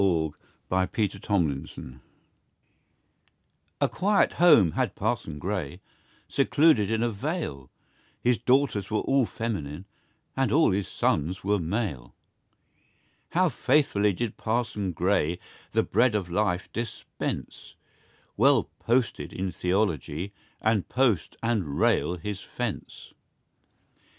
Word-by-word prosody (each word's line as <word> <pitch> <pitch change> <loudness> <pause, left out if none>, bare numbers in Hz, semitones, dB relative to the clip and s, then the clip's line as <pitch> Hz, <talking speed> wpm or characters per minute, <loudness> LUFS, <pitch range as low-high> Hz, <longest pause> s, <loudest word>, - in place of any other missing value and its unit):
Oliver 80 -5 +1 0.4
Goldsmith 95 +2 0 0.2
Parson 70 -2 -2 0.2
Gray 65 0 -9 1.8
A - - +3
QUIET 200 +1 +2
home 115 - +6
had - - -1
Parson 75 -2 -2
Gray, 90 -2 -3 0.5
Secluded 140 -6 +3
in 110 +1 +1
a 120 - +1
vale; 105 - -4 0.5
His 125 -1 +2
daughters 125 -7 +2
all 110 -1 0 0.2
were 120 - +1
feminine, 95 -7 -4 0.5
And 135 0 +1
all 155 -6 +4
his 95 0 -1
sons 80 +5 -1
were 100 +1 +1
male. 85 - -3 1.2
How 185 +2 +4
faithfully 130 -7 +2
did 115 +3 -3
Parson 110 -4 -1
Gray 90 -1 +1 0.4
The - - +3
bread 115 +2 +2
of 95 -4 -2
life 95 -1 0
dispense 115 -1 -5 0.6
Well - - +3
"posted" 120 0 0
in 95 0 -3
theology, 90 -1 -1 0.3
And 110 -3 +1
post 120 - +1
and 100 -12 -1
rail 90 - +2
his 100 +3 -5
fence. 120 -4 -6
100 Hz, 110 wpm, -27 LUFS, 90-120 Hz, 1.8 s, home